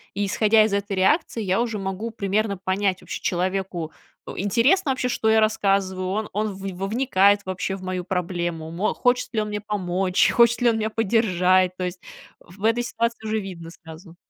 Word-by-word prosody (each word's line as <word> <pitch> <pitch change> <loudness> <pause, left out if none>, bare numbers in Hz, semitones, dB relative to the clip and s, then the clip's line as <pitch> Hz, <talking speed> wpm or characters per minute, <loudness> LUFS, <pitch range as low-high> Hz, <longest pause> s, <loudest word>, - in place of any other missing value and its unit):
и 205 - 0
исходя 215 +2 +4
из 215 -2 0
этой 200 0 -1
реакции, 225 - +1
я 190 +3 +1
уже 230 -3 -2
могу 195 +3 -4
примерно 205 -1 -1
понять, 190 0 -1
вообще, - - -7
человеку, 185 -2 -2 0.3
у, - - -8
интересно 265 - +2
вообще, 260 -1 -1
что 225 -2 0
я 220 0 +5
рассказываю, 195 -3 +1
он 210 +3 -2
он 215 +2 0
в 190 - -12 0.3
вникает 205 -4 +3
вообще 185 +1 -3
в 190 - -10
мою 185 -1 -3
проблему, 175 -3 -3
мо 180 +6 -1
хочет 245 0 +1
ли 215 - +2
он 210 - -4
мне 210 0 -4
помочь, 190 -3 +1
хочет 235 0 +4
ли 240 - +5
он 225 - -1
меня 220 0 -1
поддержать. 185 -5 +2
То 185 - -3
есть, 180 0 -4 0.4
в 195 +4 -16
этой 230 +2 +2
ситуации 235 -1 -2
уже 220 0 0
видно 175 -5 -8
сразу. 165 0 -13
200 Hz, 190 wpm, -23 LUFS, 185-220 Hz, 0.4 s, я